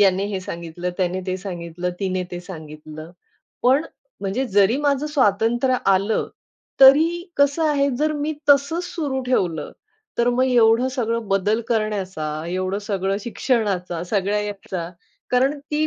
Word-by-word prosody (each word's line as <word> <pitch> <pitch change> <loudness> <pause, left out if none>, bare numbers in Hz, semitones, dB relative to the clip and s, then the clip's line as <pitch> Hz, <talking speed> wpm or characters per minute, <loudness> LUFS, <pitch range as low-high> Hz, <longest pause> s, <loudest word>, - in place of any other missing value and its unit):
याने 195 -1 +4
हे 195 -2 -3
सांगितलं, 170 0 -5
त्याने 185 0 0
ते 185 0 -1
सांगितलं, 180 -2 -5
तिने 185 -1 -1
ते 175 - -5
सांगितलं. 155 -2 -10 0.5
पण 265 +6 +4 0.4
म्हणजे 200 +7 -1
जरी 200 +4 +4
माझं 285 0 +1
स्वातंत्र्य 240 -2 +2 0.2
आलं 200 +3 +1 0.5
तरी 315 +6 +7
कसं 285 +3 +3
आहे 280 -1 +2
जर 305 +1 +1
मी 300 +1 -2 0.2
तसंच 285 +5 +3
सुरू 285 -7 -3
ठेवलं 175 -11 0 0.5
तर 235 0 +3
मग 250 +1 +2
एवढं 240 -1 +4
सगळं 230 -4 -2
बदल 200 +3 +1
करण्याचा 205 -7 -1 0.2
एवढं 185 +2 -2
सगळं 195 -1 -1
शिक्षणाचा 200 -7 -1
सगळ्या 200 +2 0
ह्याचा 195 -4 -5 0.4
कारण 265 +4 +2
ती 300 +2 -1
210 Hz, 135 wpm, -22 LUFS, 185-265 Hz, 0.5 s, तरी